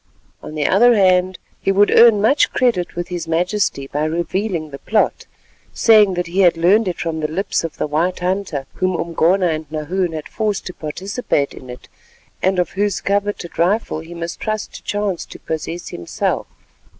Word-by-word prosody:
On 155 - -9
the 150 -1 -1
other 235 +8 +5
hand 185 -2 +3 0.2
he 195 - +1
would 205 +1 +4
earn 225 -3 +6
much 280 +7 +3
credit 235 -9 0
with 175 0 -4
his 175 -2 -4
majesty 175 -3 0
by 145 +2 -2
revealing 170 0 -2
the 140 - -8
plot, 215 -1 0 0.5
saying 210 -4 +5
that 175 0 -1
he 175 +3 -3
had 175 -3 +5
learned 195 +6 +4
it 180 - -3
from 165 -2 -2
the 155 - -1
lips 190 +4 -1
of 165 -2 -5
the - - -1
white 160 +5 0
hunter, 180 -6 -2
whom 185 -1 -1
Umgona 170 +2 +2
and 155 -2 -3
Nahoon 165 +3 -2
had 155 -1 -5
forced 215 -3 -2
to 180 - -6
participate 165 - -2
in 130 - -12
it, 125 - -10 0.5
and 190 0 +1
of 175 -2 0
whose 200 0 0
coveted 200 -4 -2
rifle 185 -1 +1
he 165 +2 -10
must 170 0 -5
trust 215 -1 -3
to - - -9
chance 205 -4 -2
to - - -10
possess 160 +2 -5
himself. 85 - -3
180 Hz, 185 wpm, -19 LUFS, 160-200 Hz, 0.5 s, earn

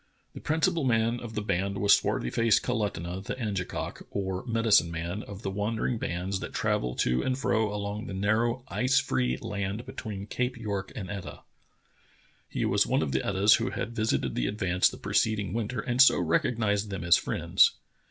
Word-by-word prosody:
The - - -8
principal 160 +1 +1
man 115 -1 +2
of 115 -2 -8
the 105 - -2
band 100 0 -1
was 100 0 +6
swarthy 60 - -1
faced 115 -2 +3
Kalutunah, 95 -6 -2
the - - -4
Angekok, 105 -7 -4
or 95 -2 -3
medicine 115 -6 +3
man, 85 +4 -4
of 100 +1 -10
the 95 - -2
wandering 110 +3 -1
bands 95 +2 -2
that - - -7
travel 60 0 0
to 60 +1 +1
and 130 0 -1
fro 110 -5 +1
along 105 +1 -4
the 95 - -5
narrow, 115 +5 +1
ice 130 +1 +2
free 65 -1 0
land 100 +3 -4
between 100 -3 -6
Cape 125 +3 -2
York 100 -4 -4
and 95 -4 -5
Etah. 100 -3 -7 1.1
He - - -1
was - - +2
one - - +2
of 70 - -2
the 65 - +1
Etahs 100 +2 +4
who 115 +2 -1
had 115 - -4
visited 110 -1 0
the - - -1
Advance 90 -3 +2
the - - -10
preceding 105 -3 0
winter 115 0 -2
and 125 +2 +2
so 135 - +7
rec 80 -2 +2
ognized 105 -3 0
them 95 -3 -4
as 85 0 +6
friends. - - +3
105 Hz, 185 wpm, -28 LUFS, 95-115 Hz, 1.1 s, so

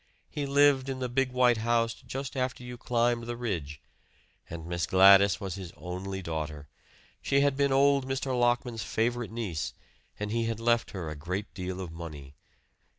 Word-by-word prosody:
He 145 -1 -3
lived 140 -1 +4
in 135 - -3
the 130 -1 -2
big 130 +1 0
white 125 -2 +4
house 115 0 +1
just 135 +3 -7
after 130 -1 -2
you 125 0 -7
climbed 120 -1 0
the 120 0 -4
ridge; 85 -12 -4 0.7
and 80 -1 -7
Miss 85 0 -2
Gladys 95 -1 +7
was 95 -2 -4
his 95 -3 -7
only 95 +2 -5
daughter. 75 -3 -4 0.5
She 140 0 +2
had 140 -1 +2
been 140 0 +2
old 140 0 +3
Mr. 135 -1 -1
Lockman's 120 -1 +1
favorite 115 +6 -1
niece, 105 -9 -4 0.4
and 105 0 -3
he 115 0 0
had 115 -1 -2
left 115 0 +2
her 90 -5 -5
a - - -6
great 90 +7 -4
deal 90 -1 -5
of 90 -3 -5
money. 75 -5 -9
115 Hz, 175 wpm, -29 LUFS, 90-125 Hz, 0.7 s, Gladys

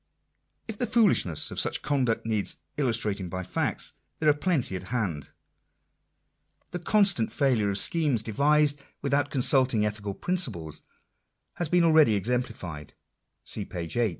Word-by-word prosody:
If 220 -2 -7
the 245 - 0
foolishness 175 - +3
of - - -3
such - - +1
conduct 130 -7 0
needs 110 -3 -1 0.2
illustrating 110 -8 -1
by 95 +1 -4
facts, 90 - -2 0.2
there 155 - +2
are - - +6
plenty 145 - -1
at 90 - -4
hand. 95 - -3 1.4
The 180 - -4
constant 180 - +2
failure 120 -5 +1
of 100 - -1
schemes 145 -5 +1
devised 145 +6 +2 0.2
without 140 0 +1
consulting 130 -4 +2
ethical 105 -2 -4
principles 115 - -2 0.8
has 175 -3 -1
been 175 0 +3
already 155 -9 +5
exemplified 100 - -4 0.5
(see - - -2
page 85 -2 -6
8). 120 -2 +2
125 Hz, 135 wpm, -27 LUFS, 100-150 Hz, 1.4 s, are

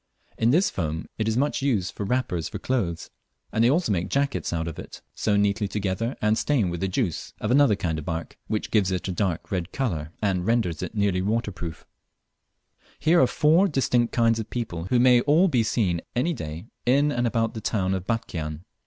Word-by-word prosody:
In 115 - +2
this 170 +10 +3
foam 80 -2 -3
it 110 - 0
is 110 +1 0
much 145 +2 +1
used 115 -10 0
for - - -5
wrappers 95 -8 -1
for - - -5
clothes; 95 -11 -2 0.4
and 110 - +2
they 120 - +5
also 155 -4 +2
make 90 -1 -1
jackets 140 0 0
of 85 -1 -2
it, - - -10
sewn 100 -1 +1
neatly 100 +1 0
together 105 +5 -2
and 105 +1 +3
stained 120 -12 +1
with 85 - -4
the 95 - +1
juice 95 - -2
of 105 - -1
another 140 -5 +5
kind 80 -5 -2
of 75 - -8
bark, 80 0 -4
which 110 - -2
gives 105 -4 +3
it 95 0 -2
a - - -1
dark 90 -2 -2
red 90 -2 -2
colour 85 - -2
and 95 -4 0
renders 110 -9 +1
it - - -5
nearly 100 -3 +1
waterproof. 100 -5 -3 1.1
Here 170 +2 +4
are 130 - +5
four 155 +9 +4
very 190 - -2
distinct 120 -3 +2
kinds 115 -1 +2
of 110 - -5
people 85 -9 -4
who 120 +6 +2
may 125 -1 +6
all 155 +8 +4
be 130 -9 +2
seen 100 -6 0
any 135 +8 +1
day 80 - -6 0.2
in 140 +4 +3
and 120 -3 0
about 115 -1 0
the 110 - -6
town 95 -3 0
of 95 0 -3
Batchian. 80 -8 -3
110 Hz, 205 wpm, -25 LUFS, 90-125 Hz, 1.1 s, may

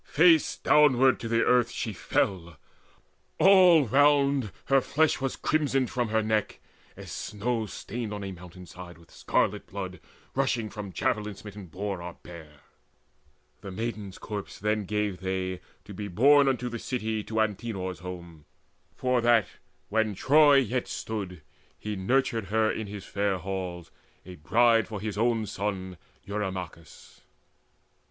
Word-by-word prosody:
Face 165 0 +4
downward 135 -3 +4
to 115 - -5
the 115 0 +2
earth 125 -1 +3
she 110 -2 -4
fell: 85 -4 -1 0.8
all 180 -4 +6
round 140 -2 +3
Her 135 0 +4
flesh 155 +2 +1
was 135 -1 -1
crimsoned 135 -5 0
from 120 -2 -1
her 110 0 +1
neck, 110 -1 -1 0.4
as - - -9
snow 110 +1 -3
Stained 110 +3 -6
on 105 -1 -5
a 95 - -5
mountain 90 0 -11
side 90 -1 -11
with 85 0 -20
scarlet - - -1
blood 95 -1 -6 0.3
Rushing, 125 -6 0
from 100 -1 -7
javelin 105 +3 -1
smitten 100 -1 -10
boar 95 +2 -4
or 85 0 -7
bear. 80 -4 -12 1.0
The 100 - -8
maiden's 105 -1 -5
corpse 105 -2 -6
then 105 0 -1
gave 105 -2 -2
they, 95 -1 -3 0.2
to 105 - -10
be 105 +2 -5
borne 140 +9 +5
Unto 125 -2 0
the 120 -1 -5
city, 110 -4 -3
to 110 0 -2
Antenor's 105 -3 -2
home, 85 -4 -9 0.5
For 125 -1 +1
that, 115 -2 +4 0.4
when 110 -1 0
Troy 145 +6 +5
yet 125 -2 +1
stood, 95 -7 -5 0.3
he 105 0 -5
nurtured 115 +3 0
her 110 +2 +1
In 110 - -4
his 100 -1 -8
fair 100 -1 -1
halls, 90 -2 -5 0.3
a 90 - -9
bride 115 +8 +3
for 105 -2 -6
his 105 0 -4
own 115 0 +1
son 95 -3 -4 0.3
Eurymachus. 95 -6 -6
105 Hz, 145 wpm, -27 LUFS, 95-120 Hz, 1.0 s, all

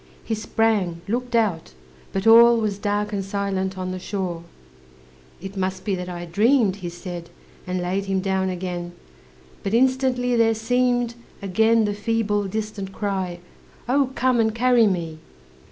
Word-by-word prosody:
He 225 - -3
sprang, 215 -5 0
looked 245 +3 -2
out, 190 - 0 0.4
but 195 +1 -2
all 235 +1 +8
Was 210 -3 -1
dark 205 +1 -1
and 200 -1 -1
silent 190 -1 -2
on 185 0 -3
the 185 - -4
shore, 180 -3 -4 1.0
"It 195 +1 -8
must 185 -1 -3
be 205 - 0
that 180 -1 -4
I 175 -1 -6
dreamed," 210 +3 +3
He 180 -3 -5
said, 175 -1 -8 0.4
and 180 0 -1
laid 190 +3 -1
him 195 -1 0
down 190 0 0
again; 175 -1 -4 0.7
But 200 +3 -1
instantly 255 -1 +2
there 225 -1 +3
seemed 245 +1 +1 0.3
Again 220 +3 +3
the 205 - -1
feeble, 210 -1 0
distant 210 -1 -4
cry, 190 -4 -3 0.5
"Oh, 270 +1 +2
come 255 -2 +2
and 220 -1 +2
carry 245 -1 +4
me!" 165 -5 -2
200 Hz, 155 wpm, -23 LUFS, 185-230 Hz, 1.0 s, all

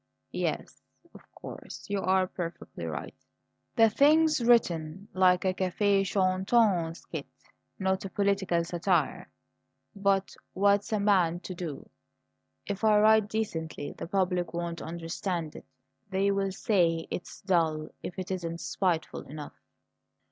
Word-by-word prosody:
"Yes, - - -3 0.3
of - - -13
course, - - -9
you 205 -1 -1
are 190 0 +3
perfectly 175 -2 -6
right. - - -5 0.6
The 225 -2 +6
thing's 305 +4 +4
written 190 -6 +2
like 185 0 +4
a 185 - +2
cafe 195 +2 +2
chantant 185 -2 +2
skit, - - -7 0.5
not 190 -1 0
a 195 - -5
political 195 -4 +1
satire. 170 0 0 0.7
But 195 -1 +1 0.2
what's 200 +2 +2
a 215 - +1
man 185 -5 +3
to 185 - -6
do? 170 -5 -6 0.8
If 205 +1 -4
I 215 -1 +5
write 215 0 +5
decently 165 -9 -3
the - - -7
public 180 -2 0
won't 170 -1 -3
understand 165 0 -4
it; - - -10 0.4
they 195 +1 +2
will 195 -1 0
say 175 -5 +1
it's 175 - -6
dull 160 -5 +1
if 180 - -7
it 185 0 -4
isn't 170 -3 -3
spiteful 175 -4 -1
enough." 150 0 -8
190 Hz, 130 wpm, -29 LUFS, 170-200 Hz, 0.8 s, The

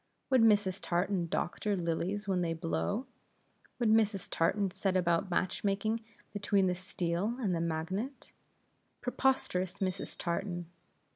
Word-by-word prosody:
Would 260 -2 +6
Mrs. 205 -4 +4
Tartan 180 0 0
doctor 200 +5 -1
lilies 180 +4 -1
when 185 -2 +1
they 165 -1 0
blow? 85 - -1 0.7
Would 235 -3 +2
Mrs. 215 -3 +2
Tartan 195 +3 +2
set 190 0 0
about 175 +1 +2
match 185 +1 0
making 215 +3 +1 0.3
between 200 -1 +2
the 180 - +2
steel 180 +3 -2
and 205 -7 +1 0.2
magnet? 190 - -3 0.7
Preposterous 245 -8 +1
Mrs. 190 0 -3
Tartan! 175 0 -2
190 Hz, 125 wpm, -32 LUFS, 175-210 Hz, 0.7 s, Would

